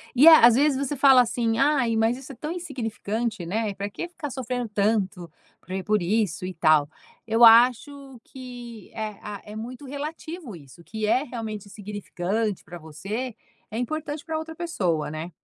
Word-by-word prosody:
E, 270 +5 +6
à 315 -6 +9
às 240 - +6
vezes, 285 +2 +3
você 280 +1 -2
fala 265 -1 +7
assim: 230 -1 0
"Ai, 270 -5 +2
mas 225 +2 +2
isso 270 +1 -10
é - - -10
tão 300 +6 -6
insignificante, 225 - -4
né, 215 +3 -1
e - - -6
pra 200 +1 -4
que 345 - -6
ficar 320 -4 -7
sofrendo 250 -2 -3
tanto 200 -4 0 0.3
por 185 - -21
e 190 0 -2
por 210 -1 +1
isso, 190 -2 0
e 185 0 -5
tal". 155 -3 +4 0.4
Eu 225 +1 +5
acho 255 +3 +5
que 245 -4 -10
é 215 -2 -5
a 205 -1 -7
é 210 - -10
muito 245 +5 -7
relativo 295 - -6
isso, 145 +3 -15
que 215 +3 -4
é 255 +5 +3
realmente 220 -6 -6
insignificante 205 0 -3
pra 175 - -9
você, 195 - -5 0.4
é 220 - -4
importante 305 +4 -4
pra 320 -1 -3
outra 320 0 -7
pessoa, 185 - -1
né? 155 +3 -6
225 Hz, 185 wpm, -25 LUFS, 200-265 Hz, 0.4 s, à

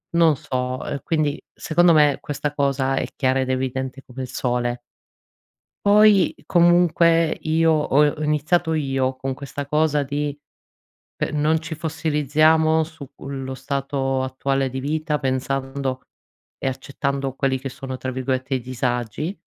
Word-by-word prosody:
non 165 -3 +5
so, 130 -1 -3
e 140 - -4
quindi 155 -2 -1
secondo 175 +2 +3
me 150 -3 +4
questa 145 0 -3
cosa 135 -2 0
è - - -1
chiara 130 -1 +1
ed 130 0 -1
evidente 130 +1 -2
come 130 +1 -8
il 130 - -4
sole. 120 -1 -1 1.1
Poi 205 -2 +6
comunque 170 -2 +4
io, 160 +1 +2
ho 150 -1 +3
ho 155 - -5
iniziato 155 +3 +1
io 135 -3 0
con 135 0 -3
questa 140 +1 -6
cosa 150 0 +2
di 145 +1 -2 0.8
pe - - -2
non 155 +2 +1
ci 160 0 -6
fossilizziamo 155 0 +2
sullo 140 -4 -7
stato 135 0 -2
attuale 135 +1 -1
di 130 +1 -5
vita, 150 +2 -1
pensando 135 0 -2 0.6
e - - -4
accettando 135 0 -3
quelli 135 -1 0
che 135 - -4
sono 130 0 -6
tra 130 0 -4
virgolette 130 +1 -2
"i 130 - 0
disagi" 125 - -3
140 Hz, 140 wpm, -22 LUFS, 130-155 Hz, 1.1 s, Poi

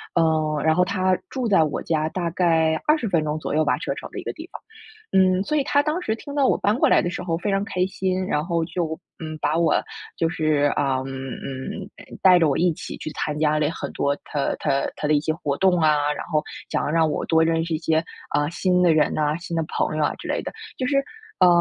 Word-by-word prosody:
呃， 155 -2 +2
然 160 0 +4
后 180 - +4
他 185 0 +1
住 255 -3 -2
在 195 -6 +5
我 150 - -2
家 155 -1 0
大 175 0 -2
概 165 -2 +2
20 300 -6 +3
分 170 -5 +1
钟 155 0 -2
左 - - -4
右 155 - +3
吧， 150 - +1
车 - - -3
程 - - -8
的 - - -6
一 - - -7
个 - - -4
地 320 +3 -10
方。 - - -8 0.5
嗯， 185 -1 +4
所 305 +7 -1
以 285 - +2
他 285 +1 +3
当 310 +4 -1
时 220 -9 -1
听 285 +5 -9
到 280 -2 +3
我 - - +3
搬 205 +3 +1
过 - - +3
来 - - +5
的 175 - -1
时 - - -5
候 165 -2 -1
非 200 +4 -2
常 195 0 +1
开 185 -4 0
心， 185 0 -2
然 150 -2 0
后 170 -2 0
就， 160 -2 -3 0.2
嗯， 155 -2 -6
把 150 +2 0
我 165 -2 +3 0.4
就 165 - +2
是， 155 -3 +1
啊， 135 -2 +1
嗯， 135 0 -6
嗯 130 -1 -6 0.3
带 185 -2 +7
着 160 -3 +3
我 140 - +1
一 175 -1 +2
起 - - -7
去 - - -6
参 150 -1 -3
加 155 0 +2
了 150 -1 +1
很 - - -6
多 140 0 0
他 145 -2 -1
他 140 -2 +1
他 150 - -2
的 155 - +3
一 150 - +4
些 155 +1 0
活 145 -3 -2
动 185 -2 +3
啊， 150 -2 +3
然 - - -6
后 155 -3 0 0.3
想 - - -1
要 - - -1
让 165 -1 +3
我 - - -2
多 160 -1 +3
认 165 0 +1
识 165 0 -3
一 - - +1
些， 160 0 +1 0.3
啊， 145 0 +1
新 180 +1 +1
的 170 -2 +5
人 155 -1 +2
呐、 150 0 +1
新 170 0 -6
的 165 - +1
朋 - - -1
友 155 - +2
啊 - - +1
之 - - -9
类 - - -1
的。 - - -5 0.3
就 255 - -1
是， 275 - +2 0.4
嗯， - - +7
165 Hz, 275 characters per minute, -23 LUFS, 155-185 Hz, 0.5 s, 带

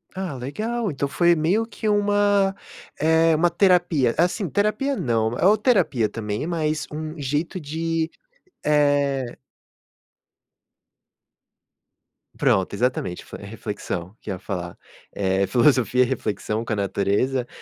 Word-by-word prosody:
Ah, 185 -4 -3
legal 215 - -3
então 140 -1 -2
foi 170 +5 +3
meio 175 +8 +1
que 225 -1 -5
uma, 205 -1 +2 0.4
eh, 160 +1 +4
uma 175 +3 +3
terapia, 175 - +3
assim, 180 +3 +1
terapia 215 - 0
não, 115 - 0
ou 190 - +4
terapia 200 - +2
também, 105 +3 -4
mas 155 -3 -1
um 155 +1 -6
jeito 145 +6 -2
de, 165 +1 -2 0.5
eh 145 -4 +2 3.0
Pronto, 95 -1 +2
exatamente. 115 -5 -1
Fle - - -10
reflexão, 100 -3 -5
que 105 - -6
eu - - -1
ia 90 - -7
falar, 90 -2 -5 0.4
eh, 95 0 +1
filosofia, 125 +3 +3
reflexão 110 -3 -2
com 115 - -2
a - - 0
natureza, 100 +6 0
145 Hz, 120 wpm, -23 LUFS, 115-175 Hz, 3.0 s, eh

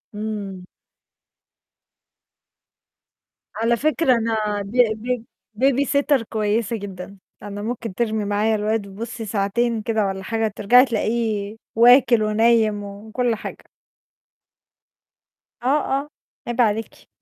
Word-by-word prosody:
إمم. 205 -3 -5 2.9
على 230 +1 +1
فكرة 305 0 +2
أنا 220 -3 -1
ب 200 0 -8 0.3
ب 245 0 -2 0.4
baby 270 +1 +3
sitter 280 -2 +2
كويسة 215 0 -1
جدًا، 195 -1 -8 0.3
أنا 205 0 -6
ممكن 230 -1 -4
ترمي 220 -2 -1
معايا 210 +2 +1
الواد 210 0 -1
بُصّي 225 +3 -7
ساعتين 220 +3 0
كده 220 -1 0
والَّا 190 0 -4
حاجة، 225 +2 -1
ترجعي 245 +6 +5
تلاقيه 220 -3 -1 0.2
واكل 240 0 +6
ونايم 215 -1 +2
وكُلّ 220 +4 -2
حاجة. - - -8 2.0
آه، 250 - -1 0.3
آه 290 - -11 0.4
عيب 240 +1 0
عليكِ. 220 -1 -1
220 Hz, 105 wpm, -22 LUFS, 205-235 Hz, 2.9 s, واكل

